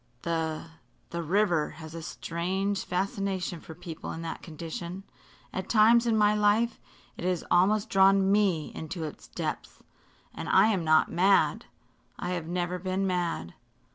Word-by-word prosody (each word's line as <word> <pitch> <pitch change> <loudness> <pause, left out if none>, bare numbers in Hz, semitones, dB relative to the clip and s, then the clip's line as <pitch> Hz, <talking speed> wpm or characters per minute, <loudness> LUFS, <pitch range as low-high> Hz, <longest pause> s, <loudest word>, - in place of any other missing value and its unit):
The 160 -2 -1 0.5
the 170 - -2
river 175 -2 +2
has 160 -1 -9
a 165 - -6
strange 190 +5 -2
fascination 190 -1 -2
for 160 - -11
people 170 -2 -7
in 165 - -6
that 165 - -5
condition. 170 +3 -7 0.5
At 185 - -4
times 230 +2 +5
in 225 -1 +3
my 210 0 +4
life 210 +3 +2 0.4
it - - -7
has 180 -2 0
almost 200 +4 +4
drawn 195 0 +4
me 195 -7 +2
into 160 +1 -5
its 155 - -7
depths - - -5 0.5
and - - -6
I 220 - +6
am 195 -6 0
not 155 0 +4
mad. 190 +4 +3 0.5
I 175 - -3
have 175 -3 -3
never 175 +1 -2
been 185 +2 -1
mad." 175 - -2
180 Hz, 150 wpm, -28 LUFS, 165-200 Hz, 0.5 s, I